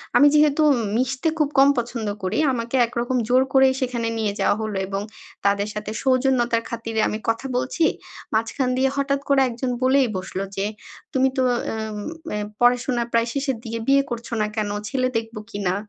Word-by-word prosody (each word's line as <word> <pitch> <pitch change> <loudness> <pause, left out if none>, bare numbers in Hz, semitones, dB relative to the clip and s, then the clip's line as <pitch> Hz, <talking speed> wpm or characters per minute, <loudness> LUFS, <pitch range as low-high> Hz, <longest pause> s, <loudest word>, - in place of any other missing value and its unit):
আমি 290 - +7
যেহেতু 300 0 +4
উম 260 - +2 0.2
মিশতে 260 +4 0
খুব 300 -2 +2
কম 270 +1 +7
পছন্দ 235 -2 -2 0.2
করি। 185 +3 -1 0.2
আমাকে 235 +1 -3
একরকম 240 +2 -2
জোর 250 +2 +4
করেই 265 -1 +5
সেখানে 240 -2 -1
নিয়ে 215 -2 -1
যাওয়া - - +3
হলো 215 -2 -3
এবং 195 0 -3 0.4
তাদের 200 0 +2
সাথে 210 0 -5
সৌজন্যতার 255 -3 +2
খাতিরে 225 -1 -3
আমি 215 - -3
কথা 230 +3 -1
বলছি। 255 +7 0 0.5
মাঝখান 225 +4 0
দিয়ে 265 +1 +3
হঠাৎ 280 0 +1
করে 275 -1 +5
একজন 245 +2 -3
বলেই 260 0 +4
বসলো 190 +1 -4
যে, 195 - -1 0.5
"তুমি 265 -1 +3
তো 260 - +3 0.3
এম 220 -1 -4 0.4
এ - - -1 0.2
পড়াশোনা 245 0 +3
প্রায় 230 0 +3
শেষের 270 -3 -1
দিয়ে 230 0 -4
বিয়ে 275 0 +5
করছো 235 0 -5
না 210 - +1
কেনো? 205 -2 -1
ছেলে 255 +1 +1
দেখবো 225 -1 -5
কিনা? 200 -4 -1
240 Hz, 180 wpm, -23 LUFS, 220-265 Hz, 0.5 s, আমি